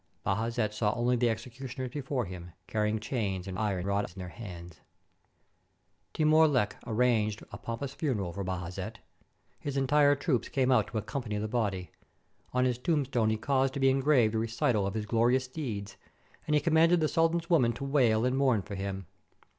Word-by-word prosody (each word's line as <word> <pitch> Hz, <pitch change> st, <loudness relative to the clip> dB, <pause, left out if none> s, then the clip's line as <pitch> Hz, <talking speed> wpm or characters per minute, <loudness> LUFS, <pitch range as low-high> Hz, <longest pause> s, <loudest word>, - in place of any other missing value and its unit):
Bajazet 110 Hz, +1 st, 0 dB
saw 105 Hz, -1 st, +1 dB
only 120 Hz, +1 st, +2 dB
the 120 Hz, 0 st, +2 dB
executioners 125 Hz, +3 st, -5 dB
before 135 Hz, -3 st, -2 dB
him, 90 Hz, -2 st, -9 dB
carrying 105 Hz, 0 st, 0 dB
chains 100 Hz, -5 st, -3 dB
and 95 Hz, 0 st, -5 dB
iron 100 Hz, -4 st, -1 dB
rods 100 Hz, -2 st, -1 dB
in -, -, -20 dB
their 90 Hz, -1 st, -6 dB
hands! 85 Hz, -5 st, -9 dB, 1.3 s
Timur 155 Hz, 0 st, +5 dB
Lenk 125 Hz, -8 st, +1 dB
arranged 110 Hz, -2 st, +1 dB
a 100 Hz, -, -8 dB
pompous 115 Hz, +5 st, -5 dB
funeral 105 Hz, -, -2 dB
for 100 Hz, -, -4 dB
Bajazet. 90 Hz, -1 st, -4 dB, 0.6 s
His 140 Hz, -1 st, -4 dB
entire 145 Hz, +2 st, +4 dB
troops 135 Hz, -3 st, -1 dB
came 130 Hz, -1 st, +1 dB
out 110 Hz, -5 st, +4 dB
to 115 Hz, -, -5 dB
accompany 110 Hz, -1 st, -3 dB
the 105 Hz, +1 st, -2 dB
body. 100 Hz, -6 st, -2 dB, 0.6 s
On 125 Hz, 0 st, +2 dB
his 125 Hz, -1 st, 0 dB
tombstone 135 Hz, -6 st, +1 dB
he 110 Hz, -, 0 dB
caused 135 Hz, +3 st, +1 dB
to -, -, -2 dB
be 135 Hz, 0 st, +4 dB
engraved 135 Hz, -5 st, +3 dB
a 110 Hz, -, +1 dB
recital 115 Hz, -2 st, 0 dB
of 100 Hz, -, -4 dB
his 110 Hz, -1 st, -2 dB
glorious 120 Hz, +4 st, +2 dB
deeds, 115 Hz, -9 st, -5 dB, 0.5 s
and 150 Hz, -, +2 dB
he 150 Hz, -, +3 dB
commanded 165 Hz, +2 st, +4 dB
the 155 Hz, -, +2 dB
sultan's 165 Hz, +2 st, +1 dB
women 125 Hz, -9 st, +4 dB
to 140 Hz, -, -7 dB
wail 125 Hz, -5 st, +3 dB
and 125 Hz, +1 st, +1 dB
mourn 130 Hz, -7 st, +2 dB
for 100 Hz, -, -8 dB
him. 95 Hz, -1 st, -4 dB
120 Hz, 180 wpm, -30 LUFS, 105-135 Hz, 1.3 s, Timur